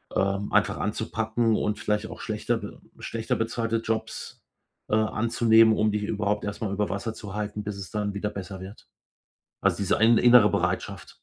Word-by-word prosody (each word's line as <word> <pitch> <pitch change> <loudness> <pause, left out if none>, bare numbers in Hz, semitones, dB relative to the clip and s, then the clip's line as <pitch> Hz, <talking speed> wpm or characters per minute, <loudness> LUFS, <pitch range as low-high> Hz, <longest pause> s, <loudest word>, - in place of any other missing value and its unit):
ähm, 100 +1 0
einfach - - +2
anzupacken 115 -2 0
und 105 -1 -1
vielleicht 105 0 -1
auch - - -9
schlechter - - -1
be - - -9 0.2
schlechter 115 -1 -2
bezahlte 115 0 -1
Jobs, 110 0 -4 0.5
äh, 105 - +2
anzunehmen, 110 0 +4
um 105 0 +2
dich 105 0 -2
überhaupt 105 0 -1
erst 105 - -5
mal 110 -3 -2
über 105 0 -1
Wasser 100 +4 -3
zu 100 -3 -8
halten, 105 0 -4
bis 105 -1 -5
es 100 -2 -7
dann 105 -1 -2
wieder 100 +1 -2
besser 95 -2 -7
wird. 95 +3 -11 0.7
Also, - - +2
diese 100 -1 +1
in 115 +1 +5
innere 120 -3 +7
Bereitschaft. - - -2
105 Hz, 175 wpm, -26 LUFS, 100-110 Hz, 0.7 s, innere